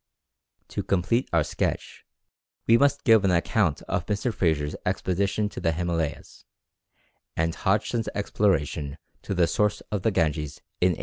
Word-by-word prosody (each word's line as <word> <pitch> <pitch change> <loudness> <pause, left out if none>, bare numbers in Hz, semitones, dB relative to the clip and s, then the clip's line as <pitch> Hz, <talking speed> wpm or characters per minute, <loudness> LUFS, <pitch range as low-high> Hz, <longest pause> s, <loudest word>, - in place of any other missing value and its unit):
To - - -3
complete 100 +7 0
our 80 -2 +3
sketch, 75 - -3 0.6
we 115 - +6
must 140 +3 +3
give 110 -3 +6
an 95 - +3
account 85 -2 +1
of 90 -3 -2
Mr. 105 +3 -1
Fraser's 75 -6 0
expedition 100 +3 0
to - - -7
the 80 - +1
Himalayas, 85 -2 -3 0.9
and 80 0 +1
Hodgson's 105 +5 0
exploration 80 -8 0 0.2
to 100 - -4
the 90 -1 +4
source 105 +4 0
of 105 -3 -1
the 110 - +2
Ganges, 75 -6 0 0.3
in 90 0 +4
1817. - - -7
90 Hz, 145 wpm, -26 LUFS, 80-105 Hz, 0.9 s, we